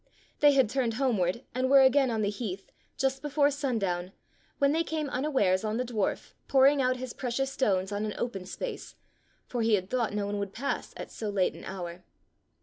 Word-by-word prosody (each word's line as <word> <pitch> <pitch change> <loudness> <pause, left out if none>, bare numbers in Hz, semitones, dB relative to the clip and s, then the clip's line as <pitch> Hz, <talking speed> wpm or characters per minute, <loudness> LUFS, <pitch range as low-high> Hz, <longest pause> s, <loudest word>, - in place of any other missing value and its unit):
They 290 -1 +6
had 265 -4 +4
turned 240 -1 -1
home 255 -5 +1
ward 180 +7 0
and 255 +1 0
were 275 0 +8
again 265 0 +4
on 220 -2 0
the 205 - +1
heath, 200 -3 -6 0.3
just 270 -1 0
before 290 0 +2
sundown, 200 -11 -2 0.4
when 280 0 +3
they 325 +2 +2
came 310 -4 -3
unawares 250 -9 +1
on 215 +1 -1
the 250 - 0
dwarf 220 -5 -2
pouring 275 +1 +5
out 255 0 +1
his 255 -1 -6
precious 265 +2 -2
stones 195 -7 0
on 205 +1 -2
an 215 -1 -3
open 195 -6 -4
space, - - -6 0.5
for 245 - -3
he 225 -1 +4
had 185 -1 -4
thought 245 -3 0
no 205 -1 -1
one 205 0 -2
would 200 -1 -4
pass 275 +4 -3
at - - -7
so 215 - -4
late 195 -3 +1
an - - -11
hour. 180 -2 -6
240 Hz, 205 wpm, -29 LUFS, 200-270 Hz, 0.5 s, were